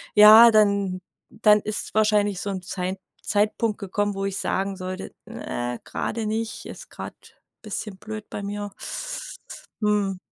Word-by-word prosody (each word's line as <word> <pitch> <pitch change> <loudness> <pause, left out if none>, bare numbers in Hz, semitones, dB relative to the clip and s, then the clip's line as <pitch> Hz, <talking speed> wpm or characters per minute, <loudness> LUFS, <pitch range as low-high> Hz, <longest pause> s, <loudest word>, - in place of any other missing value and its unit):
ja, 215 +2 +10
dann 200 -4 +3 0.3
dann 210 -1 +4
ist 215 0 -3
wahrscheinlich 210 -2 +2
so 205 - -3
'n 190 -2 -3
Zeit 185 +1 -3 0.2
Zeitpunkt 215 +1 +1
gekommen, 205 0 -2
wo 195 0 -2
ich 195 -1 -2
sagen 195 +1 -1
sollte: 185 0 -6
„Ne 120 0 -4
gerade 225 0 -3
nicht, 220 +1 -3
ist - - -9
grad - - -7 0.5
bisschen 210 -2 -5
blöd 215 +1 -7
bei - - -4
mir.“ 205 0 -4 1.1
Mhm. 205 -3 +1
205 Hz, 140 wpm, -24 LUFS, 195-215 Hz, 1.1 s, ja